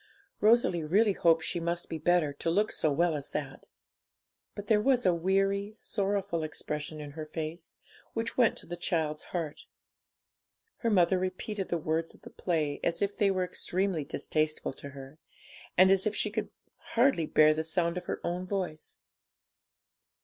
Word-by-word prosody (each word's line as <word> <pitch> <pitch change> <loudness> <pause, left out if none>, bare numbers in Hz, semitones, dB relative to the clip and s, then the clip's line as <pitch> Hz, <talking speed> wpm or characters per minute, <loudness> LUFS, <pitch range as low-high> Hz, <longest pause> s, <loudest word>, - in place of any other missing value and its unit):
Rosalie 215 -6 +4
really 200 +7 +3
hoped 165 -3 +3
she 175 - -2
must 170 +1 -2
be 160 - -5
better, 165 -2 +2
to 145 - -2
look 205 +6 +2
so 155 - 0
well 170 +3 +2
as 145 -2 -5
that. 140 -3 -5 0.9
But 205 - -6
there 210 0 +3
was 250 0 +2
a 180 - +5
weary, 195 +3 +1
sorrowful 200 -5 -1
expression 150 0 -4
in 145 -1 -7
her 155 +1 -7
face, 160 +2 -6 0.4
which 225 0 -2
went 245 -3 +3
to - - -5
the 175 - -5
child's 160 -3 -1
heart. 165 -4 -4 1.1
Her 230 - 0
mother 185 -2 +4
repeated 185 +2 -3
the 170 - +1
words 160 +1 -2
of - - -22
the - - -11
play 155 -5 -1
as 170 +3 0
if 200 0 -1
they 205 -3 +3
were 185 -1 +1
extremely 180 -1 -1
distasteful 155 0 -1
to 140 - -9
her, 140 +2 -11 0.6
and 190 +1 +7
as 195 +1 +3
if 215 - -1
she 210 - 0
could - - -2 0.5
hardly 235 - +4
bear 155 0 +5
the 160 +1 -2
sound 170 +1 0
of 180 0 -5
her - - -3
own 180 +2 -2
voice. 180 -5 -3
175 Hz, 170 wpm, -30 LUFS, 155-195 Hz, 1.1 s, and